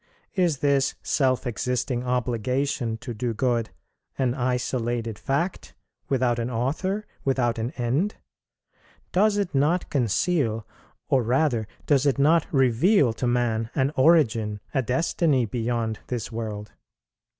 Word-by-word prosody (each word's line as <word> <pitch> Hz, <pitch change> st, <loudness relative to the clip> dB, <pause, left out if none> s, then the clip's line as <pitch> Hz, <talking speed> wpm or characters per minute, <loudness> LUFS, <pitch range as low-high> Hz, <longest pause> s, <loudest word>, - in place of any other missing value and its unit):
is 175 Hz, -6 st, +1 dB
this 140 Hz, -1 st, +2 dB
self 130 Hz, -2 st, +1 dB
existing 125 Hz, +1 st, -1 dB
obligation 125 Hz, 0 st, -1 dB
to 120 Hz, +1 st, -7 dB
do 115 Hz, +1 st, -3 dB
good, 120 Hz, -2 st, 0 dB, 0.5 s
an 130 Hz, -3 st, +1 dB
isolated 120 Hz, -3 st, -2 dB
fact, 170 Hz, +7 st, -2 dB, 0.3 s
without 125 Hz, -3 st, +1 dB
an 115 Hz, +1 st, -2 dB
author, 155 Hz, -, -1 dB, 0.2 s
without 120 Hz, -4 st, +1 dB
an 115 Hz, +2 st, -1 dB
end? 135 Hz, -, 0 dB, 1.0 s
does 205 Hz, +2 st, +3 dB
it 200 Hz, -4 st, -1 dB
not 150 Hz, +6 st, +1 dB
conceal, 120 Hz, -, +1 dB, 0.4 s
or 135 Hz, -3 st, +3 dB
rather 120 Hz, -2 st, +1 dB, 0.2 s
does 145 Hz, -1 st, +3 dB
it 140 Hz, -, +2 dB
not 155 Hz, +3 st, +4 dB
reveal 135 Hz, -, +3 dB
to 125 Hz, +2 st, -2 dB
man, 115 Hz, -2 st, 0 dB
an 135 Hz, 0 st, +2 dB
origin, 115 Hz, -8 st, +3 dB
a 135 Hz, -, +2 dB
destiny, 135 Hz, +1 st, +1 dB
beyond 115 Hz, -1 st, -2 dB
this 120 Hz, -2 st, -4 dB
world? 110 Hz, -2 st, -5 dB
125 Hz, 125 wpm, -25 LUFS, 115-145 Hz, 1.0 s, not